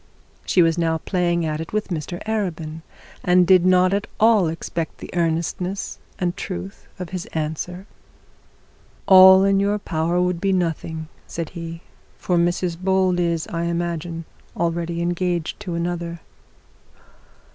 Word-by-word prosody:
She 180 - +5
was 165 +1 +2
now 165 -1 +1
playing 175 0 0
at 155 0 -2
it 165 - -8
with 215 -1 -1
Mr 175 0 -4
Arabin, 170 -8 -3 0.4
and 180 0 +5
did 185 0 +5
not 185 0 +4
at 200 +1 -1
all 220 -5 +5
expect 165 0 -4
the - - -9
earnestness 170 +3 -2 0.2
and 175 -1 -1
truth 190 +2 -7
of 180 -3 -6
his 185 -2 -5
answer. 160 +4 -3 1.2
'All 190 0 +9
in 195 0 +3
your 200 +1 +1
power 170 -2 -1
would 180 -1 0
be 195 -1 +2
nothing,' 165 -3 -2 0.2
said 165 -2 -4
he; 165 -1 -7 0.4
'for 180 - -1
Mrs 175 0 0
Bold 185 -1 +2
is, 170 -2 0
I 170 0 -2
imagine, 170 -1 -3 0.3
already 170 0 -1
engaged 175 -1 -1
to 185 -5 -5
another.' 170 0 -3
175 Hz, 140 wpm, -22 LUFS, 165-185 Hz, 1.2 s, All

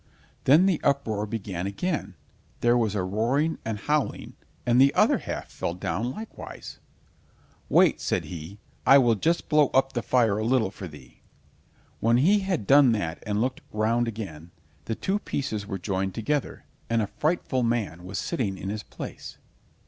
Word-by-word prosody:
Then 155 +8 +6
the 185 -5 +1
uproar 110 -7 0
began 100 -4 -4
again, 140 - -3 0.5
there 120 0 +4
was 110 -4 +1
a 95 - 0
roaring 120 - 0
and 110 -1 -3
howling, 150 +6 -1 0.3
and 120 +1 +4
the 140 +1 +6
other - - +4
half - - -6
fell 85 - -3
down 105 +6 -2
likewise. 215 - -9 0.9
"Wait," - - +4
said - - -1
he, 85 +3 -8 0.3
"I 135 - +8
will 120 -4 +4
just 165 - 0
blow 150 -2 +4
up 135 0 +3
the 120 - -1
fire 115 -5 +2
a - - -1
little 115 -4 +2
for 95 -2 -8
thee." 75 -4 -15 0.8
When 115 +1 +3
he 190 +11 +4
had 190 - -2
done 135 -1 +6
that 85 -6 -3
and 105 0 0
looked 130 +1 -1
round 115 +3 +1
again, 95 -8 -6 0.4
the 115 - -2
two 195 - -1
pieces 110 - -3
were 95 -3 -3
joined 95 0 -2
together, 145 +6 -2 0.2
and 115 -1 +2
a 105 - -8
frightful 150 -5 0
man 115 -8 -1
was 95 +2 -6
sitting 110 - -2
in 95 - -5
his 105 +1 -3
place. - - -9
115 Hz, 170 wpm, -26 LUFS, 100-135 Hz, 0.9 s, I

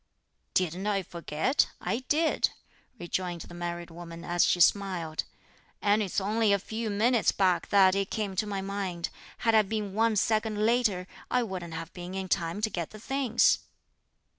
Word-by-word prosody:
"Didn't 185 +2 0
I 200 -2 +1
forget? 170 - 0
I 230 - -1
did," 315 +2 +2 0.5
rejoined 175 -2 -3
the - - -10
married 175 0 -5
woman 170 0 -9
as 175 0 +2
she 175 - +3
smiled; 175 -4 +2 0.5
"and 205 +1 +3
it's 195 -2 0
only 215 +2 +2
a 200 - +5
few 220 +3 -4
minutes 225 +3 +3
back 185 -3 +1
that 190 -2 +6
it 195 0 0
came 205 -3 -2
to 215 - +1
my 200 -2 -2
mind; 190 -3 -3 0.4
had 225 - +4
I 220 - +7
been 210 -1 -3
one 225 +1 +2
second 215 0 +1
later 225 -6 +2 0.2
I 250 -1 +2
wouldn't 180 -6 -5
have 165 0 -6
been 180 +1 -7
in 190 -1 -4
time 170 +2 0
to 220 - +1
get 170 -3 -3
the 215 - -11
things." 255 -1 +2
195 Hz, 170 wpm, -29 LUFS, 175-215 Hz, 0.5 s, I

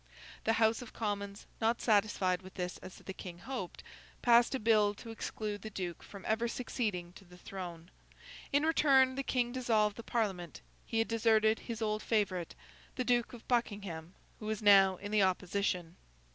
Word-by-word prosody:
The 225 - +3
House 225 +1 +3
of 245 - -10
Commons, 200 -2 -3 0.2
not 225 +1 +2
satisfied 200 -4 +2
with 185 0 -13
this 180 -2 -4
as 185 - -10
the 190 - -8
King 180 -2 -8
hoped, 195 -1 -6 0.4
passed 240 +2 +5
a - - -1
bill 210 -2 +3
to 225 +2 -9
exclude 210 -2 -4
the 220 - -6
Duke 180 -5 -5
from 200 -2 -11
ever 225 +2 +1
succeeding 210 -8 -3
to 195 - -14
the 180 -1 -16
throne. 175 -2 -8 0.6
In 285 +2 +3
return, 270 -5 +5
the 275 - -2
King 245 -3 0
dissolved 220 -5 +1
the - - -5
Parliament. 190 -9 -2 0.3
He 225 - -2
had 225 - +2
deserted 220 -1 +3
his 230 -2 -5
old 215 0 0
favourite, 195 -7 0 0.4
the 255 - -1
Duke 240 -1 +2
of 235 - -11
Buckingham, 200 -8 -2 0.2
who 215 - -6
was 215 -1 -2
now 195 -2 +7
in 205 +3 -7
the 215 -1 +4
opposition. 185 -2 0
210 Hz, 175 wpm, -33 LUFS, 190-230 Hz, 0.6 s, now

